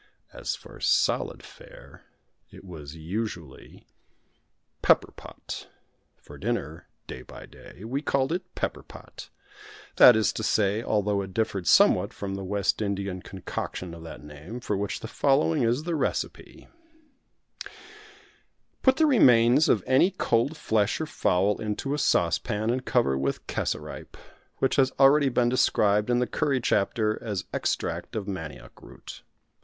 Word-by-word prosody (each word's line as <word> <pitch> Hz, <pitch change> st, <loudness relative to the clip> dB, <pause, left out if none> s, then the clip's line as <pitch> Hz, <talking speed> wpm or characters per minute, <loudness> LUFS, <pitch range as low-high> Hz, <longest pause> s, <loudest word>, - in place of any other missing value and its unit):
As -, -, -4 dB
for -, -, -14 dB
solid -, -, +1 dB
fare -, -, -15 dB, 0.4 s
it -, -, -14 dB
was 80 Hz, -4 st, -9 dB
usually 85 Hz, -3 st, -6 dB, 1.0 s
Pepper -, -, +3 dB
pot -, -, -10 dB, 0.5 s
for -, -, -14 dB
dinner, 80 Hz, +3 st, -4 dB, 0.2 s
day 65 Hz, -, -8 dB
by -, -, -12 dB
day. 95 Hz, -, -15 dB
We 130 Hz, +6 st, -3 dB
called 135 Hz, -1 st, 0 dB
it 180 Hz, +1 st, -5 dB
Pepper -, -, -3 dB
pot -, -, -13 dB, 0.7 s
that 125 Hz, -, +9 dB
is 110 Hz, -1 st, +1 dB
to -, -, -4 dB
say, 105 Hz, -1 st, +1 dB
although 105 Hz, -3 st, 0 dB
it 95 Hz, 0 st, -8 dB
differed 100 Hz, -5 st, -1 dB
somewhat -, -, +4 dB
from 100 Hz, -1 st, -5 dB
the 95 Hz, 0 st, -5 dB
West 100 Hz, +2 st, -1 dB
Indian 100 Hz, -2 st, -3 dB
concoction 90 Hz, -2 st, -6 dB
of 85 Hz, -, -10 dB
that 80 Hz, -2 st, -10 dB
name, 75 Hz, +10 st, -9 dB
for 115 Hz, -4 st, -2 dB
which 100 Hz, 0 st, -3 dB
the -, -, -6 dB
following 145 Hz, +5 st, +1 dB
is 120 Hz, +5 st, +1 dB
the 170 Hz, +1 st, -3 dB
recipe: 155 Hz, -, -3 dB, 2.1 s
Put 260 Hz, -1 st, +4 dB
the 320 Hz, -, +4 dB
remains 130 Hz, -, +5 dB
of 100 Hz, -, +3 dB
any 130 Hz, +8 st, +4 dB
cold 145 Hz, -5 st, 0 dB
flesh 110 Hz, -7 st, 0 dB
or 160 Hz, -, -2 dB
fowl 100 Hz, -8 st, 0 dB
into 110 Hz, +6 st, -3 dB
a 150 Hz, -, -2 dB
saucepan, 105 Hz, -, +1 dB
and 130 Hz, +1 st, -2 dB
cover 70 Hz, -, +1 dB
with 70 Hz, 0 st, -2 dB
cassaripe -, -, -5 dB, 0.4 s
which 135 Hz, -, 0 dB
has 135 Hz, -1 st, +4 dB
been 130 Hz, -, -26 dB
already 140 Hz, +1 st, +5 dB
described 120 Hz, -4 st, +2 dB
in 120 Hz, -, +3 dB
the 125 Hz, -, +2 dB
Curry 135 Hz, +3 st, 0 dB
chapter 110 Hz, -1 st, 0 dB
as 105 Hz, -5 st, -3 dB
extract -, -, -2 dB
of 105 Hz, -2 st, -4 dB
Manioc 75 Hz, -10 st, -8 dB
root. -, -, -12 dB
110 Hz, 145 wpm, -26 LUFS, 95-130 Hz, 2.1 s, that